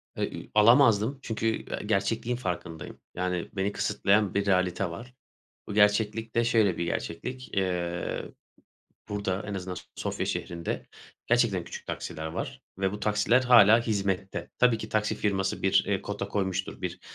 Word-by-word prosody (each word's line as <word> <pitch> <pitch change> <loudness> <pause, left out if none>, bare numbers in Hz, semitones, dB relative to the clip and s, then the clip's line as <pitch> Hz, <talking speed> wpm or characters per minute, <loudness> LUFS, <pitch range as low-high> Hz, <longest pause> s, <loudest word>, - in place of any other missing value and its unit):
E - - -1
i - - -9
alamazdım 115 +2 +5
çünkü, 115 -1 -2 0.2
e - - -4
gerçekliğin 110 +4 0
farkındayım. 85 -6 -5 0.2
Yani, 90 -1 -2
beni 100 +1 -1
kısıtlayan 100 -1 +1
bir 100 0 +1
realite 90 -1 +1
var. 115 +9 -9 0.5
Bu 105 - -5
gerçeklik 110 +2 +2
de 115 - +3
şöyle 110 -6 +3
bir 85 - 0
gerçeklik. 125 +10 -4
Eee, 90 -2 -1 0.8
burada 100 -1 -2
en 105 - -4
azından 90 -1 -4
S - - -8
Sofya - - -3
şehrinde 85 -1 -3 0.4
gerçekten 115 -7 +2
küçük - - -9
taksiler 80 0 -5
var 80 - -5 0.2
ve 95 0 0
bu 105 - -6
taksiler 110 +4 +3
hâlâ 115 -3 +7
hizmette. 100 -4 -2
Tabii 125 -3 +4
ki 110 - -6
taksi 110 0 0
firması 95 -2 -1
bir 95 0 +2
kota 100 -1 -4
koymuştur. 95 -2 -2
Bir, 90 -1 -4
100 Hz, 150 wpm, -28 LUFS, 95-110 Hz, 0.8 s, hâlâ